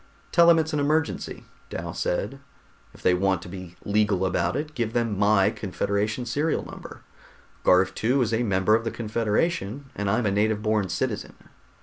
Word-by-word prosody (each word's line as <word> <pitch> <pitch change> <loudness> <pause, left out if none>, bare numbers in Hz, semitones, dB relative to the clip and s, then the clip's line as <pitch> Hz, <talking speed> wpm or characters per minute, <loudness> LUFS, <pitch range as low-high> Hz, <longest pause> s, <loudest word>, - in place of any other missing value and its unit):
"Tell 170 -1 +6
them 170 -1 +7
it's 160 -1 0
an 150 - +1
emergency," 150 +2 -1 0.3
Dal - - -5
said. 105 +9 -2 0.5
"If - - -17
they 90 - +4
want 95 -1 +1
to - - -10
be 90 -1 -9
legal 100 -2 +2
about 90 +1 0
it, 150 +2 -3
give 115 -5 -2
them 115 -3 0
my 100 0 +3
Confederation 105 +4 -2
serial 145 +7 -1
number. - - -10 0.6
Garv 90 +1 +4
II 130 +4 +3
is 115 -2 0
a 110 - +2
member 100 -2 +2
of 115 +1 +3
the 115 - -1
Confederation, 115 - -1
and 100 -1 -2
I'm 110 +4 +1
a 100 - +2
native 105 +1 +1
born 110 -3 +1
citizen." - - -2
110 Hz, 180 wpm, -25 LUFS, 100-125 Hz, 0.6 s, them